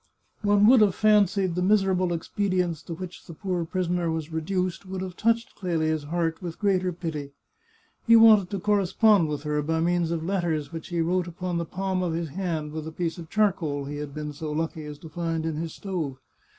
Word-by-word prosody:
One 205 0 +4
would 245 +1 +7
have 205 -3 +4
fancied 200 -3 +3
the 180 - -1
miserable 190 -2 +2
expedients 180 -1 -1
to 165 - -5
which 180 +1 -9
the 165 - -9
poor 180 -2 -2
prisoner 175 -1 -1
was 160 0 -3
reduced 180 +3 -2
would 190 0 -4
have 185 -2 -6
touched 230 +2 0
Clelia's 160 -5 -1
heart 165 +1 -1
with 170 -2 -6
greater 185 -3 +1
pity. 160 -5 -5 0.7
He 230 - +8
wanted 220 -5 +7
to 200 - -3
correspond 205 -1 +3
with 150 -1 -3
her, 150 -1 0
by 160 +2 -1
means 170 0 +1
of 165 -1 -2
letters 165 -5 -1
which 165 -1 -6
he 175 -2 -1
wrote 180 +2 0
upon 175 0 -3
the 170 - -2
palm 190 +2 -2
of 175 -3 -1
his 165 -1 -2
hand 160 -2 -3
with 155 0 -5
a - - -5
piece 170 +2 -3
of 165 -2 -9
charcoal 175 -10 0
he 145 +1 -5
had 150 -1 -5
been 150 +1 -5
so 155 +1 -5
lucky 160 0 -3
as 150 -1 -7
to 160 - -11
find 165 -1 -2
in 160 -2 -2
his 165 0 -4
stove. 165 -9 -4
175 Hz, 205 wpm, -26 LUFS, 160-190 Hz, 0.7 s, He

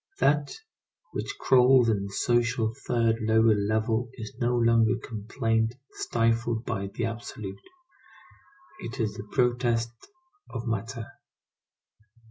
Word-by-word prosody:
That 145 0 +2 0.6
which 405 - -4
crawls 125 -1 +5
in 100 -3 +1
the - - -10
social 120 +1 +1
third 115 -2 +2
lower 110 0 +4
level 110 +3 0
is 110 -2 -7
no 120 0 +1
longer 115 0 +4
complaint 115 +1 -1 0.2
stifled 115 0 0
by 100 -4 -2
the 110 +4 -3
absolute; 115 -3 -6 1.2
it 120 +3 -7
is 110 -3 0
the 105 0 -8
protest 120 -2 +1 0.6
of 115 -1 -5
matter. 115 +1 -3
115 Hz, 110 wpm, -27 LUFS, 110-120 Hz, 1.2 s, crawls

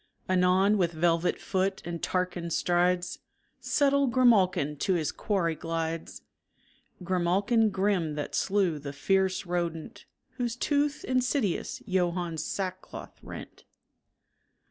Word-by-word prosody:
Anon 185 +3 +3
with 170 -2 +1
velvet 165 +1 +1
foot 190 0 -1
and 170 -1 -5
Tarquin 180 -2 -2
strides 175 +1 +1 0.4
Subtle 280 -1 +2
grimalkin 195 - +3
to 190 -3 +1
his 160 -4 0
quarry 185 -6 0
glides 165 0 -4 0.8
Grimalkin 195 +6 +2
grim 190 -6 0
that 145 -1 -4
slew 190 -6 +1
the 140 -1 -7
fierce 190 +5 +1
rodent 170 -2 -3 0.3
Whose 240 -2 -1
tooth 290 +2 0
insidious 255 - -1
Johann's 175 -4 -1
sackcloth 185 -1 -5
rent. - - -10
185 Hz, 105 wpm, -28 LUFS, 170-205 Hz, 0.8 s, Anon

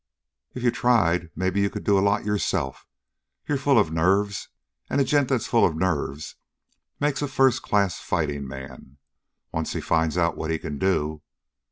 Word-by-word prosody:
"If 125 - -5
you 120 - +4
tried, 90 -10 +2
maybe 95 +2 0
you 100 - +2
could - - -7
do 100 - +3
a 95 - +4
lot 100 +1 +1
yourself. 95 -9 -2 0.6
You're 145 - 0
full 140 0 +3
of 80 - +3
nerves, 95 +4 +1 0.4
and - - 0
a - - +5
gent 140 0 +2
that's 130 -4 0
full 115 -3 +3
of 80 - +3
nerves 75 -4 -2 0.6
makes 145 -1 0
a 145 - 0
first 130 -2 +3
class 100 -3 +1
fighting 75 -4 -2
man, 65 0 -10 0.5
once 80 0 -2
he - - -2
finds 80 0 0
out 85 -1 +2
what 80 - -4
he 80 - +1
can 75 -2 -6
do. 80 -5 0
95 Hz, 180 wpm, -25 LUFS, 80-115 Hz, 0.6 s, a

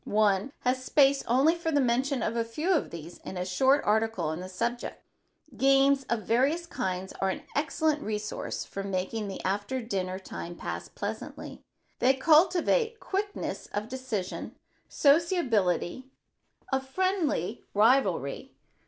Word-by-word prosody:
One 210 +3 +2
has 255 +1 0
space 275 +1 +4
only 270 +7 +4
for 335 -1 -3
the 290 - +3
mention 260 0 +1
of 225 - -1
a 230 - +1
few 300 +11 -2
of 315 - +1
these 170 +1 -9
in 190 - -7
a 180 - -2
short 265 +10 +3
article 220 -3 +1
on 155 +2 -2
the 185 +1 -7
subject. 235 +6 -3 0.6
Games 270 +2 +4
of 235 -2 0
various 275 +9 +2
kinds 190 - -3
are 195 - +2
an 190 - -4
excellent 305 0 +1
resource 210 -3 -4
for 195 - -6
making 195 +3 -2
the 195 - -6
after 205 +7 -1
dinner 190 -6 -3
time 175 -2 -7
pass - - -5
pleasantly. - - -6 0.4
They 260 +2 +4
cultivate 350 - +3
quickness 400 +1 -3
of 210 +2 -2
decision, 250 -8 -4 0.3
sociability, 260 - +2 0.7
a 265 - +4
friendly 295 - -1
rivalry. 205 - +2
240 Hz, 140 wpm, -28 LUFS, 195-280 Hz, 0.7 s, space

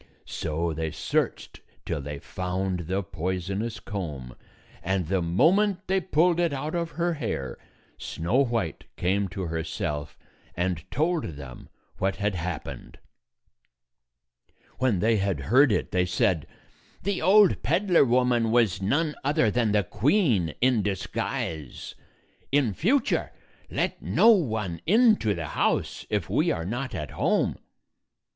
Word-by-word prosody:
So 80 +1 -2
they 80 +1 -2
searched - - -2 0.2
till 80 -4 -2
they 75 +1 -6
found 90 +1 -3
the 95 +2 -1
poisonous 95 +6 -3
comb, 75 - -6 0.5
and 95 -1 -1
the 95 -1 +1
moment 185 - +2
they 190 +1 +1
pulled 175 0 +2
it 170 -2 +2
out 150 +3 -3
of 170 -2 -2
her 175 0 +1
hair, 110 - -4 0.4
Snow 85 +10 -1
White 115 - -2
came 100 +3 +1
to 95 +1 -5
herself 80 -3 -3 0.4
and 90 -1 -2
told 155 +7 0
them 65 -3 -10 0.3
what 95 0 0
had 105 0 -1
happened. 85 -8 -5 1.8
When 120 -9 +2
they 110 0 +3
had 100 -5 0
heard 125 - +4
it, - - 0
they 90 0 +1
said, 90 -3 +1 0.6
"The 200 0 -1
old 195 +3 +5
peddler 175 +1 +3
woman 125 -2 +2
was 110 -6 +2
none 150 +10 +1
other 145 -5 +2
than 115 -2 +1
the 105 -1 +3
queen 110 - +1
in 125 -3 +3
disguise. 90 -6 -4 0.6
In 135 -7 +2
future 235 - +1 0.4
let - - -2
no 230 - +5
one 110 - 0
into 215 - +4
the 80 -3 -5
house, - - -1
if - - -1
we - - +1
are 85 - -1
not 120 +4 -3
at 75 -6 -5
home." - - +1
100 Hz, 135 wpm, -26 LUFS, 85-145 Hz, 1.8 s, old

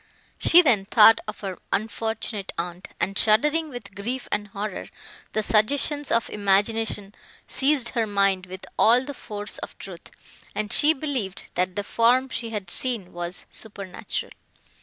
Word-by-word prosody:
She 350 +2 +7
then 220 - +3
thought 225 +2 +7
of 215 - -7
her 190 -3 -5
unfortunate 220 -1 -2
aunt, 175 +2 -5
and, 190 +3 -1
shuddering 300 +11 +2
with 245 -7 -9
grief 240 +6 -4
and 205 0 -1
horror, 205 0 -5 0.5
the 215 - +1
suggestions 285 +7 +1
of 230 0 +2
imagination 205 0 +1 0.3
seized 275 -3 +1
her 230 -3 -1
mind 195 -2 +1
with 185 +1 -9
all 245 +3 +5
the 285 - -6
force 210 -5 -5
of - - -8
truth, - - -10 0.5
and 210 -1 -1
she 300 +2 +7
believed, 260 -10 -3
that 180 0 -1
the 205 - -2
form 245 +5 +2
she 230 -2 -4
had 205 -5 -5
seen 230 -7 -3
was 175 +1 -5
supernatural. 200 -4 -5
215 Hz, 150 wpm, -24 LUFS, 195-245 Hz, 0.5 s, She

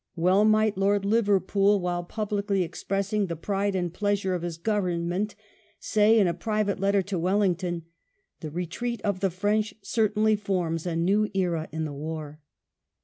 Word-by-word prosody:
Well 185 +5 +3
might 215 -1 +3
Lord 200 0 +2
Liverpool, 200 -1 +3
while 175 -1 -2
publicly 200 0 -1
expressing 200 +4 -2
the 170 - -3
pride 200 +4 -1
and 175 -2 -1
pleasure 205 -1 0
of 180 - -2
his 170 -2 -4
Government, 185 0 -1 0.4
say 215 +1 +3
in 205 - +5
a 175 - +1
private 210 +3 -1
letter 195 0 +2
to 190 -2 -3
Wellington, 180 -2 0 0.6
"The 155 - -6
retreat 180 +9 -3
of 200 -3 0
the 195 - +1
French 205 +4 0
certainly 215 -1 +2
forms 180 -5 -2
a 170 - -2
new 200 +6 +2
era 170 -4 0
in 160 +1 -3
the 150 - -5
war." 150 0 -6
195 Hz, 155 wpm, -26 LUFS, 175-210 Hz, 0.6 s, in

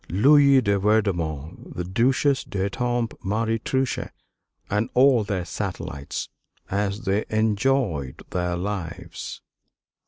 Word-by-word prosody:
Louise 140 - +6
de 100 -1 +2
Vaudemont; 85 -8 -1
the 90 - -2
Duchesse 130 +9 +2
d'Étampes; 115 +4 -1
Marie 110 +3 0
Touchet; 130 +3 -1 0.6
and 105 +3 0
all 130 -3 +5
their 100 -4 -2
satellites, 70 -4 -4 0.4
as 100 +2 -1
they 105 -1 0
enjoyed 110 - 0
their 90 -1 -1
lives. 90 -3 -5
105 Hz, 100 wpm, -24 LUFS, 95-120 Hz, 0.6 s, Louise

